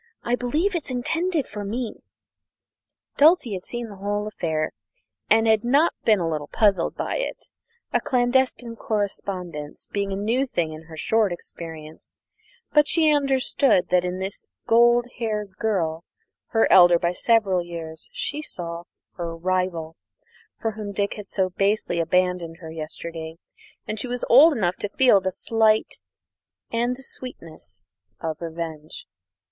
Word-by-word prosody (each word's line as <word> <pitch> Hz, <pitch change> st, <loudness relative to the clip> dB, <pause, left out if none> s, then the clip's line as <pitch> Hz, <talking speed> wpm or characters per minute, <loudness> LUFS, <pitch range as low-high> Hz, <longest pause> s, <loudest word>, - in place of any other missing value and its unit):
I 240 Hz, -, +1 dB
believe 300 Hz, +11 st, 0 dB
it's 340 Hz, -5 st, -3 dB
intended 325 Hz, +5 st, -1 dB
for 210 Hz, -1 st, -6 dB
me." 225 Hz, +3 st, -4 dB, 1.2 s
Dulcie 300 Hz, -, +5 dB
had 185 Hz, -, -4 dB
seen 240 Hz, +4 st, -5 dB
the 205 Hz, -2 st, -11 dB
whole 205 Hz, +1 st, -2 dB
affair 160 Hz, -7 st, -2 dB, 0.6 s
and 225 Hz, +1 st, +5 dB
had 220 Hz, -1 st, +4 dB
been 240 Hz, -, -4 dB
not 300 Hz, +5 st, +4 dB
a 220 Hz, -, +7 dB
little 155 Hz, -3 st, -2 dB
puzzled 195 Hz, -4 st, +2 dB
by -, -, -2 dB
it, -, -, -5 dB, 0.4 s
a -, -, +3 dB
clandestine 245 Hz, -2 st, +1 dB
correspondence 185 Hz, -8 st, -4 dB
being 200 Hz, -1 st, -1 dB
a -, -, -1 dB
new 230 Hz, +7 st, 0 dB
thing 165 Hz, -9 st, -1 dB
in 155 Hz, +1 st, -10 dB
her 160 Hz, -1 st, -11 dB
short 220 Hz, +2 st, +2 dB
experience; 160 Hz, -2 st, -9 dB, 0.6 s
but 300 Hz, -1 st, +5 dB
she 315 Hz, -2 st, +4 dB
understood 270 Hz, -7 st, +2 dB
that 180 Hz, -1 st, +3 dB
in 180 Hz, 0 st, -2 dB
this 190 Hz, +1 st, -5 dB, 0.2 s
golden 240 Hz, +1 st, +4 dB
haired 210 Hz, -4 st, -3 dB
girl, 170 Hz, -7 st, -1 dB, 0.4 s
her 225 Hz, -, +3 dB
elder 175 Hz, -2 st, +8 dB
by 170 Hz, +1 st, 0 dB
several 195 Hz, -2 st, +2 dB
years, 165 Hz, -2 st, -8 dB
she -, -, -2 dB
saw 170 Hz, -, -6 dB, 0.3 s
her 170 Hz, -2 st, -4 dB
rival, 175 Hz, -2 st, -1 dB, 0.6 s
for 225 Hz, -, -2 dB
whom 210 Hz, -1 st, -6 dB
Dick 200 Hz, 0 st, 0 dB
had 210 Hz, -2 st, -9 dB
so 190 Hz, -2 st, 0 dB
basely 195 Hz, -2 st, 0 dB
abandoned 180 Hz, -1 st, 0 dB
her 165 Hz, -2 st, -9 dB
yesterday, 160 Hz, +1 st, -7 dB, 0.5 s
and 215 Hz, -, -3 dB
she 250 Hz, -, -3 dB
was 245 Hz, 0 st, -2 dB
old 295 Hz, +7 st, +8 dB
enough 180 Hz, -4 st, 0 dB
to 205 Hz, -, -3 dB
feel 240 Hz, -3 st, +5 dB
the 190 Hz, -, -1 dB
slight 220 Hz, +1 st, +1 dB, 0.7 s
and 240 Hz, +2 st, 0 dB
the 265 Hz, -, -12 dB
sweetness 165 Hz, -, -9 dB, 0.3 s
of 160 Hz, -1 st, -4 dB
revenge. 160 Hz, -2 st, -6 dB
200 Hz, 150 wpm, -24 LUFS, 170-240 Hz, 1.2 s, elder